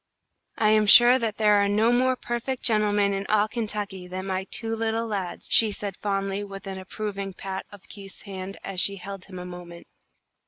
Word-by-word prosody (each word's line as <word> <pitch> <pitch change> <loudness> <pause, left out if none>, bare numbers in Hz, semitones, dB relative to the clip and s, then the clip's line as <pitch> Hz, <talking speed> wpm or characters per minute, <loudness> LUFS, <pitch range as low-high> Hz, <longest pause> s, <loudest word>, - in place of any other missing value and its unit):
"I 215 - +3
am 215 -1 +3
sure 240 +4 +8
that 225 -3 -2
there 210 -2 +4
are - - +2
no 215 +3 +3
more 255 +1 +2
perfect 245 +1 -4
gentlemen 205 -2 +2
in 195 0 -2
all 215 0 +3
Kentucky 210 -5 -4
than 185 +1 -5
my 190 0 -2
two 225 -1 -3
little 225 0 -1
lads," 195 -5 -4
she 220 -2 +6
said, 200 -2 -5
fondly, 195 0 -2
with 195 0 -9
an 190 -1 -6
approving 195 0 -5
pat 190 0 -6
of 205 -1 -14
Keith's 195 -2 -11
hand 195 -1 -7
as 185 -2 -1
she 200 - +3
held 195 0 -8
him 185 - -10
a 180 - -7
moment. 175 -1 -10
205 Hz, 195 wpm, -25 LUFS, 195-220 Hz, -, sure